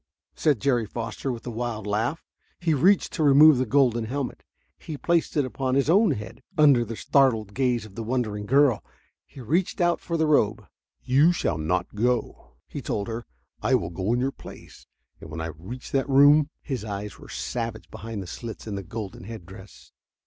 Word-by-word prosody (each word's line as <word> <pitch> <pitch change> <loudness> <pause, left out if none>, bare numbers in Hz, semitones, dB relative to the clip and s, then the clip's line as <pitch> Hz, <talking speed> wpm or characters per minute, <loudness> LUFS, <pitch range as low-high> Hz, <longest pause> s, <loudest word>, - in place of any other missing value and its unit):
said 145 -7 +1
Jerry 120 -4 +1
Foster, 115 +4 -4
with 120 -2 -7
a 120 - -4
wild 115 -2 -4
laugh. 110 +10 -1 0.3
He 170 -2 +1
reached 185 +8 +3
to 160 - -1
remove 145 0 +7
the 130 - 0
golden 120 -3 +2
helmet. 135 +3 -4 0.4
He 155 - -7
placed 170 +1 0
it 145 - +3
upon 130 0 -2
his 140 +3 +2
own 205 +4 +5
head, 105 +4 -5 0.2
under 140 -6 +6
the 115 0 -6
startled 115 -6 +2
gaze 125 -3 0
of 105 - -13
the 115 - -6
wondering 110 -3 -2
girl. 135 -3 +3 0.4
He 135 - -12
reached 165 - 0
out 175 -1 +2
for 170 - -2
the 160 - +2
robe. 110 -8 +2 0.4
"You 140 +7 +4
shall 85 - -1
not 90 +3 -1
go," 120 +3 -2
he - - -6
told 100 -1 -3
her. 115 +1 -5 0.3
"I - - +3
will 85 - -1
go 95 +5 -2
in 120 - +1
your 135 +2 0
place. - - -13 0.3
And - - -11
when 80 +1 -6
I 80 0 -3
reach 105 +11 -9
that 135 0 0
room...." 145 +2 +6
His 130 -7 -4
eyes 105 -1 -6
were - - -13
savage 115 -3 -5
behind 110 -3 -6
the - - -10
slits 115 +4 -8
in 110 - -5
the 100 - -3
golden 100 -2 -7
head 110 -4 -8
dress. 95 +1 -14
120 Hz, 195 wpm, -25 LUFS, 105-140 Hz, 0.4 s, remove